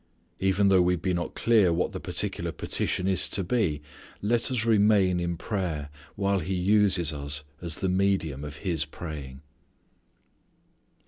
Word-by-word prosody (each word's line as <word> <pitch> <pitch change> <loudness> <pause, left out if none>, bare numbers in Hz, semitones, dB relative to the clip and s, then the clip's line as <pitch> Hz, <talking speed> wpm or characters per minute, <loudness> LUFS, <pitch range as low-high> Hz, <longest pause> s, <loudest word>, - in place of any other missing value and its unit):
Even 95 +1 +2
though 95 -2 +5
we 90 0 +2
be 90 +2 -2
not 85 0 -3
clear 110 -6 +3
what 85 +2 0
the - - -5
particular - - -2
petition 95 - -1
is 95 -6 +3
to 95 - -2
be 85 -8 0 0.4
let 115 +4 +1
us 120 -4 -1
remain 105 -5 +3
in 85 -1 -2
prayer 85 -7 -3 0.3
while 100 -1 +1
He 95 +1 -3
uses 95 -3 +3
us 75 +1 -2 0.2
as 85 -2 -1
the 95 - -2
medium 90 -7 0
of 75 0 -7
His 85 -5 +1
praying. 75 -4 -8
90 Hz, 150 wpm, -27 LUFS, 80-100 Hz, 0.4 s, though